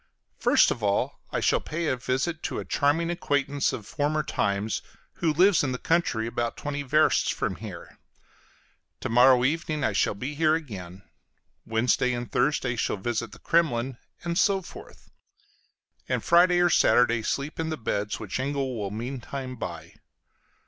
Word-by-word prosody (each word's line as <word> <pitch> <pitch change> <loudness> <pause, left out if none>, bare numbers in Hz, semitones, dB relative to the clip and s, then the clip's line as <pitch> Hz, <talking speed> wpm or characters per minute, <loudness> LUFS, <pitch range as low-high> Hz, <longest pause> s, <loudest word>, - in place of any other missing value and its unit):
First - - +4
of - - -3
all 100 -1 0
I - - -1
shall - - +3
pay 165 +2 -4
a 140 - +1
visit 130 +6 -2
to - - -3
a - - -4
charming 160 +4 +1
acquaintance 145 -4 0
of 105 - -6
former 150 +4 -1
times, 100 -4 -1 0.4
who 165 -2 +1
lives 180 +3 +4
in 130 -3 -1
the - - -2
country, 160 -8 0
about 115 0 -3
twenty 145 0 -4
versts 150 +3 +3
from - - -2
here; - - -10 1.0
to - - -3
morrow 125 +1 +6
evening 155 +1 -1
I 110 - +1
shall 100 - +1
be 130 +8 -5
here 155 +1 +3
again; 95 - -7 0.6
Wednesday 120 +2 +1
and 120 0 -5
Thursday 135 -4 +1
shall 110 - -1
visit 115 +2 -3
the 105 - -12
Kremlin 135 -7 0 0.2
and 170 +1 -1
so 195 -2 +2
forth; 395 - -13 1.0
and - - 0
Friday 175 +1 +5
or 175 -1 +4
Saturday 120 -2 +4
sleep 140 +7 -3
in 160 0 -1
the 155 - -3
beds 105 -3 -2
which 110 +2 -4
Engel 135 -1 -2
will 100 -2 -3
meantime 130 +4 -5
buy. - - -7
135 Hz, 165 wpm, -26 LUFS, 115-155 Hz, 1.0 s, morrow